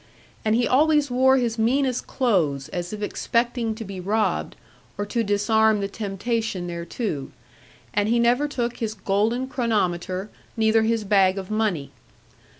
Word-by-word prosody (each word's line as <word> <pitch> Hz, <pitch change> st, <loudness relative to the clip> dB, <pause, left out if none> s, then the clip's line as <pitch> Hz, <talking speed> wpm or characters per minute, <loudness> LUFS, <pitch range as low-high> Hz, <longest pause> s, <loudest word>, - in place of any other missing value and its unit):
And 220 Hz, 0 st, +2 dB
he 240 Hz, 0 st, +2 dB
always 295 Hz, 0 st, +3 dB
wore 265 Hz, +2 st, +4 dB
his 235 Hz, -3 st, -1 dB
meanest 255 Hz, +2 st, +1 dB
clothes 160 Hz, -, 0 dB
as 175 Hz, 0 st, -4 dB
if 210 Hz, -1 st, -5 dB
expecting 235 Hz, +1 st, -1 dB
to 225 Hz, 0 st, -7 dB
be 195 Hz, -1 st, -7 dB
robbed, 210 Hz, +4 st, -1 dB, 0.4 s
or 205 Hz, -, -2 dB
to 230 Hz, +3 st, -1 dB
disarm 220 Hz, +1 st, +3 dB
the 200 Hz, -, -1 dB
temptation 205 Hz, -1 st, -3 dB
thereto; 170 Hz, -, -4 dB, 0.6 s
and 205 Hz, +1 st, +1 dB
he 235 Hz, -, +3 dB
never 240 Hz, +5 st, +3 dB
took 245 Hz, -4 st, -3 dB
his 220 Hz, -2 st, -3 dB
golden 215 Hz, +6 st, 0 dB
chronometer 200 Hz, -, -1 dB, 0.3 s
neither 220 Hz, 0 st, +4 dB
his 225 Hz, 0 st, +1 dB
bag 195 Hz, -2 st, +3 dB
of 190 Hz, +1 st, -6 dB
money. 210 Hz, -10 st, -1 dB
220 Hz, 150 wpm, -24 LUFS, 195-240 Hz, 0.6 s, wore